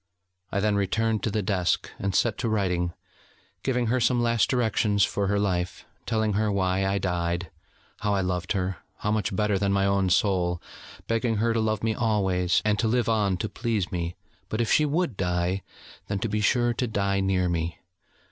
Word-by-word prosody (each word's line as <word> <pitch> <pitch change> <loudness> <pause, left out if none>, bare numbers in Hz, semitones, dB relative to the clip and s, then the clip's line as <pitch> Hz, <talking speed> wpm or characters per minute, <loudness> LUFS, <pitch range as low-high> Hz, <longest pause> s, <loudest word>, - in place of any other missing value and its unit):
I 100 - 0
then 105 0 +2
returned 110 +2 +1
to - - 0
the 105 0 -1
desk, 95 -3 0
and 100 -1 -1
set 115 -3 +2
to 115 - 0
writing, 90 -5 0 0.7
giving 125 -2 0
her 125 +3 +1
some 120 +1 +2
last 115 -1 +2
directions 110 -4 +2
for 100 -1 -1
her 100 +1 +1
life, 90 -3 -1 0.2
telling 110 -2 +1
her 105 +1 +1
why 95 0 +1
I 100 +1 +1
died, 85 -2 -1 0.5
how 105 -1 0
I 95 - +1
loved 90 -1 -1
her, 95 -2 -1 0.3
much 105 -2 0
better 105 -1 +1
than 100 0 +1
my 100 0 +2
own 100 -1 +2
soul, 90 -3 +2 0.5
begging 115 0 0
her 115 +2 +1
to 115 - +1
love 110 -1 -1
me 110 0 +1
always, 95 -6 +1
and 105 -1 +2
to 115 - +2
live 120 0 +1
on 105 -4 +2
to 110 - -2
please 110 -5 -2
me, 85 -1 -3 0.3
but 110 - -2
if 115 - +1
she 155 - +5
would 155 - 0
die, 90 +1 0 0.5
then 100 - -1
to 105 - -1
be 105 0 -1
sure 120 +2 +2
to 125 +1 -1
die 100 -2 0
near 95 -1 +1
me. 85 -1 -2
100 Hz, 195 wpm, -26 LUFS, 95-110 Hz, 0.7 s, she